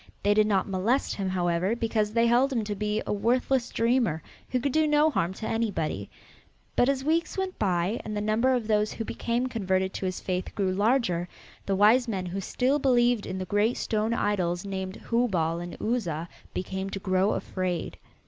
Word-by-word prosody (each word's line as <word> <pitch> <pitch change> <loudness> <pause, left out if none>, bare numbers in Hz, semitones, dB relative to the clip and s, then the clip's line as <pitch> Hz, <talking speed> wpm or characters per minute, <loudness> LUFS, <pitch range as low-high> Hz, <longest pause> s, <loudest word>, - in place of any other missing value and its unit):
They 205 - +4
did 215 0 +4
not 195 -3 +1
molest 205 +8 0
him, 195 -2 -2
however, 180 +3 0
because 220 -2 0
they 230 +1 +3
held 245 +4 +3
him 235 -4 0
to 210 0 -3
be 210 +1 -1
a - - -1
worthless 245 +4 +1
dreamer 230 -9 +1 0.3
who 255 - 0
could 275 +3 -1
do 315 +2 +3
no 300 +1 +4
harm 175 - 0
to 220 - -5
anybody. 170 - -2 0.7
But 245 - +4
as 270 -1 0
weeks 325 +5 0
went 380 -1 -3
by, 185 +2 0
and 215 -1 -4
the - - 0
number 215 +5 +2
of 245 -3 +1
those 210 -1 +1
who 225 - -4
became 235 +3 -1
converted 190 -6 -1
to 190 - -3
his 185 - -3
faith 185 0 -3
grew 190 -3 0
larger, 200 -5 +1 0.4
the 195 - +1
wise 220 +6 +5
men 195 -5 -2
who 185 +2 -4
still 265 +8 +1
believed 245 -4 +3
in 185 - -4
the 185 - -3
great 205 +5 +1
stone 215 +1 -1
idols 180 -5 0
named 190 -1 -4 0.2
Hubal 180 -9 +1
and 175 0 -7
Uzza 175 -9 -1 0.2
began 190 +1 -4
to 195 - -4
grow 190 +1 +1
afraid. 180 -3 -3
210 Hz, 195 wpm, -27 LUFS, 185-240 Hz, 0.7 s, wise